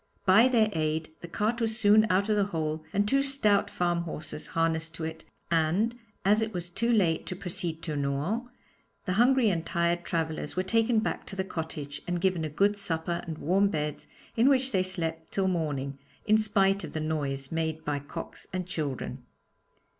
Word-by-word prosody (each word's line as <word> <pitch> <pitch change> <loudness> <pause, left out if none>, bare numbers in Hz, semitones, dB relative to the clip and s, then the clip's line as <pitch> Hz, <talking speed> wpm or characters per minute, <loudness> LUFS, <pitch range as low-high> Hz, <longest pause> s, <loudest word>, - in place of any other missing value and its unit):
By 200 +6 +7
their 225 -4 +3
aid, 155 0 -1
the 170 - -7
cart 220 +7 -1
was 220 -1 0
soon 215 -1 +5
out 190 +2 +2
of 215 - +2
the 205 -1 +3
hole 155 -4 -2
and 205 +1 +1
two 275 +4 +3
stout 270 -8 +3
farm 175 -1 0
horses 155 -2 -6
harnessed 165 0 0
to 165 - -6
it, 160 0 -5 0.3
and 170 +8 +2 0.3
as 210 +3 +4
it 220 -2 -2
was 175 0 -3
too 230 +7 0
late 180 -8 +2
to 185 - -3
proceed 175 -3 -3
to 155 - -3
Nohant, 145 - -1 0.6
the 185 - 0
hungry 255 -2 +5
and 165 -3 -1
tired 170 0 0
travellers 160 -3 -2
were 185 - +1
taken 225 +3 +2
back - - -3
to 195 - -6
the 190 - -1
cottage, 160 -5 -5
and 175 0 -1
given 185 -2 +1
a 155 - -2
good 200 +7 +2
supper 170 -3 -1
and 160 -2 -4
warm 195 +6 +2
beds, 150 -4 -3 0.3
in 235 +4 +5
which 265 -1 +2
they 190 - +2
slept 165 -3 -1
till 195 -1 +1
morning, 145 -6 -2 0.3
in 215 0 +5
spite 200 -2 +2
of - - -7
the 155 - -2
noise 140 -3 -2
made 160 -1 -2
by 145 -1 -1
cocks 145 - -8
and 185 -1 -3
children. 150 -7 -4
175 Hz, 190 wpm, -28 LUFS, 160-205 Hz, 0.6 s, By